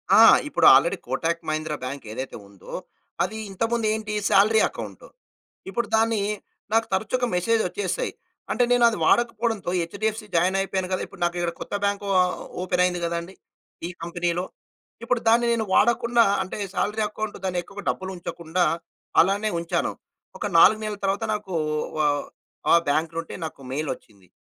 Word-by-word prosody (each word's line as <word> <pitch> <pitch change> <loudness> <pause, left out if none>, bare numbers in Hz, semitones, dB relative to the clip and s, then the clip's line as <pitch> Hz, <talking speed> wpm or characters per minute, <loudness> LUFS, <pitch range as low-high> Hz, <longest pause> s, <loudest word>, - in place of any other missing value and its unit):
ఆ! - - +8 0.3
ఇప్పుడు - - +1
already - - +3
Kotak 170 0 -1
Mahindra 155 0 -2
bank 135 +2 -5
ఏదైతే 130 +4 -5
ఉందో, 100 -2 -13 0.5
అది 205 +5 -3
ఇంతకుముందు 225 +3 0
ఏంటి 215 -1 -4 0.2
సాలరీ 210 +2 +5
అకౌంట్. - - -8 0.6
ఇప్పుడు 235 +5 -1
దాన్ని 225 -1 +2 0.5
నాకు 225 0 +4
తరచుగా 230 +6 0
మెసేజ్ 225 +6 +2
వచ్చేసాయి. - - -2 0.4
అంటే 245 - +2
నేనది 235 -2 +4
వాడకపోవడంతో 230 -2 +1
హెచ్‌డీఎఫ్‌సీ 215 +6 -2
జాయిన్ 180 +3 +3
అయిపోయాను 190 -1 -2
కదా! 185 - 0
ఇప్పుడు 190 - -15
నాకిక్కడ 175 0 0
కొత్త - - -7
బ్యాంక్ 200 0 -1
అకౌంట్ 190 -1 +4
ఆహ్, 180 0 -1 0.2
ఓపెన్ 180 0 +1
అయింది 180 -1 +1
కదాండి 170 +2 -3 0.5
ఈ - - -6
కంపెనీలో. 175 +1 -1 0.6
ఇప్పుడు 240 0 +1
దాన్ని 235 +1 +4
నేను 225 -1 0
వాడకుండా 235 0 +4 0.2
అంటే 190 - -7 0.2
సాలరీ 210 +2 0
అకౌంట్ 215 0 -5
దాన్ని 180 -2 -1
ఎక్కువగా 200 +3 -10
డబ్బులు 190 0 -3
ఉంచకుండా 170 0 -2 0.6
అలానే 200 +4 +3
ఉంచాను. 170 0 -1 0.5
ఒక - - -4
4 215 +6 +7
నెలల 210 -1 -3
తర్వాత 195 +3 0
నాకు 210 -3 -5 0.5
ఆహ్, 145 -1 +1 0.5
ఆ - - +7 0.2
బ్యాంక్‌లో 160 +3 0
ఉంటే 165 - -9
నాకు 155 -3 -8
మెయిల్ 150 +3 -2
వచ్చింది. 100 -6 -19
190 Hz, 150 wpm, -24 LUFS, 170-220 Hz, 0.6 s, ఆ